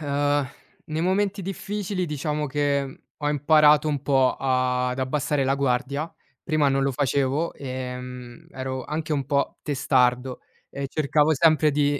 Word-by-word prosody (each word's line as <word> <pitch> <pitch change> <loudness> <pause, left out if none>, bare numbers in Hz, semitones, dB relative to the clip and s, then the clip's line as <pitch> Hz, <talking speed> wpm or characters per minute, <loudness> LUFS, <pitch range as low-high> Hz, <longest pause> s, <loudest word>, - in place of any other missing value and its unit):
uhm, 145 -1 0 0.4
nei 155 +1 -3
momenti 195 +2 0
difficili 195 0 -3
diciamo 150 0 -2
che 140 -1 -1 0.2
ho 145 - -2
imparato 150 +1 +4
un 145 -3 -2
po' 135 -3 +3
a 125 -1 +1
ad 125 +1 -4
abbassare 135 +1 0
la 135 +1 +2
guardia. 140 +4 -1 0.3
Prima 155 -3 +2
non 135 0 +1
lo 135 0 +1
facevo. 140 +3 0
Ehm, 125 -2 -7
ero 130 -1 -5
anche 155 0 -3
un 140 -2 -1
po' 140 -1 -1
testardo 130 -2 +1 0.3
e 140 0 -5
cercavo 150 +1 +2
sempre 155 0 +4
di 145 0 +1
140 Hz, 145 wpm, -24 LUFS, 130-150 Hz, 0.4 s, imparato